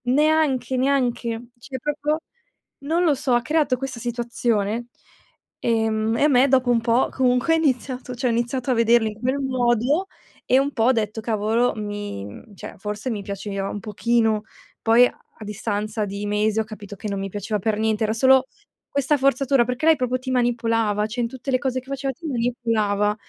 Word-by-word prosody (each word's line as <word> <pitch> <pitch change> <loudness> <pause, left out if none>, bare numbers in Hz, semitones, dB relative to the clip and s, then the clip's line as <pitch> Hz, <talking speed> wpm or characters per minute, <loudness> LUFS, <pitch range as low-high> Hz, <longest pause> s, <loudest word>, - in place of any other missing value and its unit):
Neanche, 270 -2 +2
neanche. 245 -3 0
Cioè 260 +2 -7
proprio 295 +3 -1 0.6
non 325 +5 0
lo 320 -4 +4
so, 260 -1 -1
ha 240 - +3
creato 295 -1 +1
questa 265 -2 -5
situazione, 235 -2 -1 0.7
ehm, 225 -1 +1
e - - +2
a - - +6
me 265 -2 +5
dopo 260 -1 +3
un 235 -1 +3
po' 235 +2 +2
comunque 250 +4 +2
ha - - +4
iniziato 255 -4 -1
cioè 250 +1 0
ho - - +1
iniziato 240 +2 -1
a - - +4
vederli 230 0 +4
in 210 0 -10
quel 260 +4 0
modo 255 - +1 0.4
e 260 - +4
un 280 +1 0
po' 225 - 0
ho 255 - +6
detto, 220 -2 -1
cavolo 225 +2 +1
mi 205 - -5
mhmm, 150 - -12
cioè - - -9
forse 210 +5 -4
mi 215 -4 -3
piaceva 195 0 -4
un 205 - -4
pochino. 220 +1 +1 0.4
Poi 230 +2 +6
a - - -12 0.2
a 215 - -8
distanza 210 +1 -2
di 200 +1 -5
mesi 210 +1 +1
ho - - +2
capito 210 -2 -10
che 205 - -7
non 200 -1 -2
mi 195 - -3
piaceva 205 +2 -3
per 215 +1 0
niente, 220 0 +1
era 215 0 +1
solo 265 +3 +5 0.4
questa 280 +1 +1
forzatura, 270 -1 +3
perché 250 +6 -1
lei 325 - +7
proprio 255 0 -1
ti 255 +1 -7
manipolava, 230 -4 +1
cioè 240 +3 -3
in 230 - -1
tutte 260 +2 -8
le 255 - +4
cose 260 -1 -2
che 260 - -25
faceva 275 0 -3
ti 330 +4 -9
manipolava. 230 -5 0
240 Hz, 195 wpm, -23 LUFS, 215-260 Hz, 0.7 s, lei